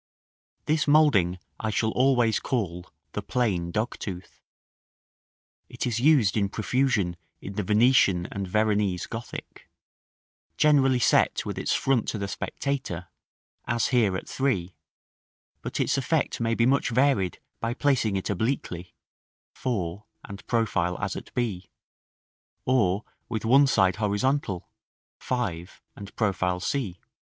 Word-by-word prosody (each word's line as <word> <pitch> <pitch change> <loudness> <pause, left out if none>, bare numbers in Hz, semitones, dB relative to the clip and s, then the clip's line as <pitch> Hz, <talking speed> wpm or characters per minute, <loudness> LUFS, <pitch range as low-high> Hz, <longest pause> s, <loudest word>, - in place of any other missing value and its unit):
This 155 -1 +1
moulding 140 - +4 0.2
I 110 - -2
shall 110 +1 0
always 125 -4 +3
call 90 -8 -3 0.2
"the - - -3
plain 95 -9 -1
dogtooth;" 100 -3 -4 1.3
it - - -4
is 120 -2 -1
used 130 -7 +4
in 100 -3 +1
profusion 110 -6 0 0.2
in 100 - -7
the 105 - -2
Venetian 105 -3 +4
and 100 -1 -4
Veronese 105 -2 +1
Gothic, 115 +1 -8 0.9
generally 135 -4 +4
set 120 - +3
with - - -4
its - - 0
front 135 -5 +1
to - - -2
the 100 -1 -3
spectator, 95 -4 -4 0.6
as 120 -1 0
here 110 -8 +2
at - - -8
3; 100 - -1 0.9
but - - -4
its - - +1
effect - - 0
may 115 0 +1
be 115 - +3
much 135 +1 +2
varied 125 -7 +2 0.2
by 115 +1 -2
placing 130 -9 +1
it 95 - -2
obliquely 100 -4 -2 0.6
(4, 100 -5 -3 0.2
and 100 -1 -10
profile 90 -7 0
as - - -2
at - - -8
b); 100 -7 -2 1.0
or 105 -6 +2 0.3
with 110 -2 -3
one 135 +5 +6
side 95 -6 +3
horizontal 105 -1 0 0.5
(5, 95 -9 -3 0.2
and 100 0 -10
profile 95 -4 0
c). 100 -3 -2
110 Hz, 125 wpm, -26 LUFS, 95-125 Hz, 1.3 s, one